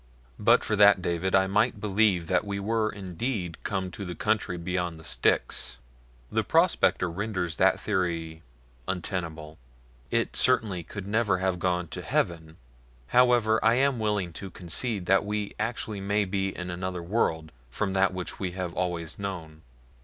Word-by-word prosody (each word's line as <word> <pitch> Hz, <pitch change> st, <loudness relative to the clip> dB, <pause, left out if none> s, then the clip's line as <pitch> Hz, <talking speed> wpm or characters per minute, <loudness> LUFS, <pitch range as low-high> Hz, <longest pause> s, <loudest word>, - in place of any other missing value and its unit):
"But -, -, +5 dB
for 105 Hz, -, 0 dB
that, 100 Hz, -1 st, +7 dB
David, 90 Hz, +1 st, 0 dB
I 95 Hz, 0 st, +5 dB
might 105 Hz, +3 st, +1 dB
believe 100 Hz, -3 st, +2 dB
that -, -, +1 dB
we 100 Hz, -1 st, -3 dB
were 110 Hz, +2 st, 0 dB
indeed 95 Hz, -1 st, -4 dB
come 95 Hz, -2 st, -2 dB
to 100 Hz, -, -7 dB
the 90 Hz, -2 st, -5 dB
country 105 Hz, -5 st, 0 dB
beyond 90 Hz, -1 st, -2 dB
the -, -, -13 dB
Styx. -, -, +1 dB, 0.5 s
The -, -, +1 dB
prospector 90 Hz, -, +3 dB
renders 90 Hz, -2 st, -3 dB
that -, -, +4 dB
theory 85 Hz, -5 st, -2 dB, 0.5 s
untenable 80 Hz, -4 st, -4 dB, 0.5 s
it, -, -, 0 dB
certainly, 110 Hz, -8 st, +2 dB
could 100 Hz, +3 st, -8 dB
never 105 Hz, -2 st, +1 dB
have 95 Hz, -1 st, -1 dB
gone 90 Hz, -1 st, 0 dB
to -, -, -6 dB
heaven. 80 Hz, -1 st, -1 dB, 0.5 s
However 120 Hz, -3 st, +4 dB
I 115 Hz, +1 st, +5 dB
am 135 Hz, -1 st, +2 dB
willing 105 Hz, -5 st, -1 dB
to 95 Hz, +4 st, -7 dB
concede 95 Hz, +4 st, -1 dB
that 95 Hz, +2 st, +4 dB
we 105 Hz, 0 st, -3 dB
actually 110 Hz, -2 st, -3 dB
may 100 Hz, +1 st, +1 dB
be 95 Hz, 0 st, -1 dB
in 90 Hz, -1 st, -5 dB
another 90 Hz, 0 st, -4 dB
world 80 Hz, -5 st, 0 dB, 0.2 s
from 95 Hz, +9 st, -2 dB
that 95 Hz, 0 st, +3 dB
which 90 Hz, -1 st, -6 dB
we 90 Hz, -2 st, -3 dB
have 90 Hz, -2 st, -4 dB
always 90 Hz, -2 st, -3 dB
known. 85 Hz, -6 st, -6 dB
95 Hz, 160 wpm, -27 LUFS, 85-105 Hz, 0.5 s, that